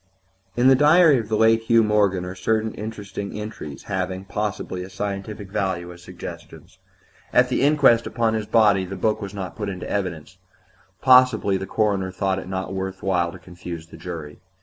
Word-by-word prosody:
IV 120 - +1
In - - +6
the 135 - +8
diary 150 0 +6
of 110 -2 -6
the 110 - +1
late 115 +1 +4
Hugh 115 0 +4
Morgan 100 -4 +2
are 90 - -5
certain 110 +3 -1
interesting 105 -1 -6
entries 105 -9 -7
having, 95 -1 -3
possibly, 100 -2 -3
a 90 - -7
scientific 100 0 -5
value 90 -3 -2
as 85 - -15
suggestions. - - -10 0.5
At 125 0 +4
the 125 - 0
inquest 140 -5 +4
upon 115 -1 0
his 110 -1 -2
body 105 -4 +4
the 95 +1 -6
book 110 +2 0
was 100 0 -6
not 95 -3 -6
put 105 0 -4
in 95 -2 -6
evidence; 90 -3 -4 0.6
possibly 125 -6 +5
the 95 0 -3
coroner 100 -3 0
thought 95 0 -1
it 95 - -9
not 95 0 -4
worth 95 0 -5
while 90 -3 +1
to 90 - -10
confuse 85 -2 -9
the 85 - -14
jury. 80 -4 -8
100 Hz, 185 wpm, -23 LUFS, 95-110 Hz, 0.6 s, the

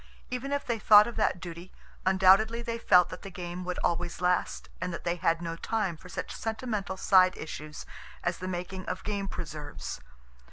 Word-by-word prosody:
Even 250 +2 -3
if 285 0 -1
they 235 -2 -1
thought 210 0 +8
of 235 - -6
that 215 -4 +1
duty, 170 +1 -8 0.4
undoubtedly 195 +5 +5
they 230 0 -3
felt 180 -5 +5
that - - -8
the 195 - -8
game 180 -1 -6
would 180 0 -3
always 175 0 -1
last, 180 0 0
and 180 0 -2
that 170 - -6
they 175 0 -1
had 165 0 +1
no 165 -1 -3
time 200 0 -1
for 180 +3 -14
such - - -5
sentimental 220 -4 -3
side 185 -1 +5
issues 155 -1 -7 0.4
as 175 0 -1
the 185 - -5
making 185 +1 -4
of 185 - -4
game 200 -2 -2
preserves. 150 - -6
185 Hz, 190 wpm, -29 LUFS, 175-210 Hz, 0.4 s, thought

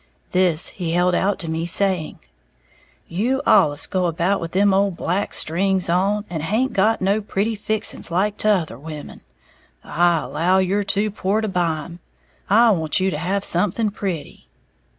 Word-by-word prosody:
This 180 -3 +2
he 170 -3 -4
held 180 +1 +2
out 195 +3 +1
to 165 - -4
me, 160 +1 -2
saying, 185 -3 0 0.9
"You 235 +10 -1
allus 145 +1 +4
go 185 -2 -1
about 175 +4 0
with 165 0 -5
them 200 +1 +3
old 195 -2 +1
black 190 +4 -1
strings 185 +2 +1
on, 200 +4 +1
and 160 -3 -4
haint 220 - 0
got 215 +3 +2
no 200 +3 +1
pretty 205 +2 -1
fixings 215 +1 -2
like 195 +4 0
t'other 180 - 0
women, 150 0 -9 0.6
I 170 0 +2
allow 170 +6 +1
you're 190 +2 +1
too 205 +1 -1
poor 200 +1 -1
to 220 - -2
buy 170 -5 -1
'em. 170 0 -11 0.5
I 225 +3 +5
want 160 -4 +1
you 190 0 +1
to 150 - -3
have 190 +4 -2
something 205 +4 0
pretty." 185 -7 -6
185 Hz, 165 wpm, -21 LUFS, 170-205 Hz, 0.9 s, I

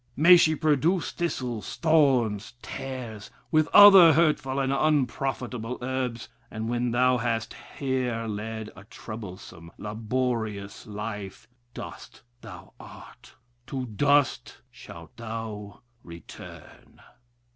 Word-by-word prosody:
May 170 +5 +7
she 160 -2 +4
produce 155 +4 +1
thistles, 125 - -4
thorns, 125 -9 +2
tares, 125 -6 -7 0.2
with 155 -1 +3
other 195 -5 +9
hurtful 150 -4 +1
and 135 0 0
unprofitable 130 -4 -1
herbs, 125 -2 -3 0.2
and 110 +1 -5
when 120 +1 -1
thou 125 +1 +2
hast 115 -1 -2 0.2
here 125 -4 -2
led 110 0 -5
a 95 - -13
troublesome, 95 -7 -10
laborious 110 -2 -3
life, 105 -2 -7 0.3
dust - - -10 0.2
thou 95 -7 -12
art, - - -14 0.3
to 130 -2 -4
dust 140 +5 +1
shalt - - -13
thou 110 -2 -7 0.2
return...... 85 0 -13
120 Hz, 105 wpm, -26 LUFS, 110-135 Hz, 0.3 s, other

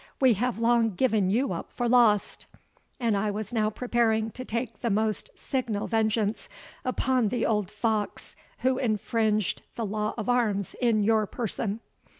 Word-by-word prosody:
We 260 -3 +5
have 245 +4 -1
long 230 -2 +2
given 215 -4 +2
you 245 +7 +1
up - - -6
for 245 - -2
lost, 230 -4 +3 0.5
and 230 -4 +1
I 205 +1 0
was 210 +2 -4
now 215 -2 +2
preparing 225 -1 0
to 255 - -7
take 230 -2 -4
the 235 - -1
most 215 0 0
signal 235 -6 -2
vengeance 220 -1 0 0.3
upon 255 -2 +1
the 245 +4 0
old 210 -4 0
fox 215 0 -2 0.3
who 260 0 +2
infringed 215 -2 0
the 230 - -2
law 210 +1 -2
of 220 - -4
arms 220 -6 +1
in 225 -4 +3
your 215 0 +3
person." 225 -1 -3
220 Hz, 155 wpm, -27 LUFS, 210-240 Hz, 0.5 s, We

